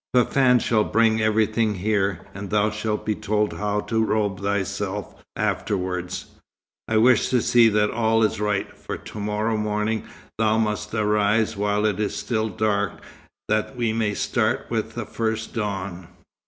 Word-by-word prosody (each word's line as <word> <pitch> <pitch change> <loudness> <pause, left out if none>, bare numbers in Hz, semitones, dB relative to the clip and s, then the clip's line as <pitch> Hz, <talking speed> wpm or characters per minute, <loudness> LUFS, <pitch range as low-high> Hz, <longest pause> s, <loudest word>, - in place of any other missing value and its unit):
"Fafann 125 +1 +4
shall 110 -2 +2
bring 110 0 +2
everything 110 0 +2
here, 100 -2 0
and 100 0 -7
thou 105 +1 +2
shalt 110 0 -3
be 110 - +1
told 105 0 0
how 105 0 -1
to 110 +1 0
robe 105 -3 0
thyself 100 0 -3
afterwards. 90 -2 -2 0.6
I 110 - +1
wish 120 +1 +4
to 125 - +3
see 115 0 +5
that 105 0 +2
all 110 -1 +2
is 105 - +1
right, 105 -2 -1
for - - -6
to - - -9
morrow 105 +2 -1
morning 105 +1 -1 0.3
thou 110 0 +3
must 105 -1 -1
arise 105 +1 +2
while 105 +1 0
it 105 -2 0
is 105 - -1
still 110 -2 -1
dark, 100 0 0 0.5
that 110 +4 0
we 120 -3 0
may 110 -2 0
start - - 0
with - - -2
the - - -3
first 110 -1 -3
dawn." 95 -5 -4
105 Hz, 155 wpm, -23 LUFS, 105-110 Hz, 0.6 s, see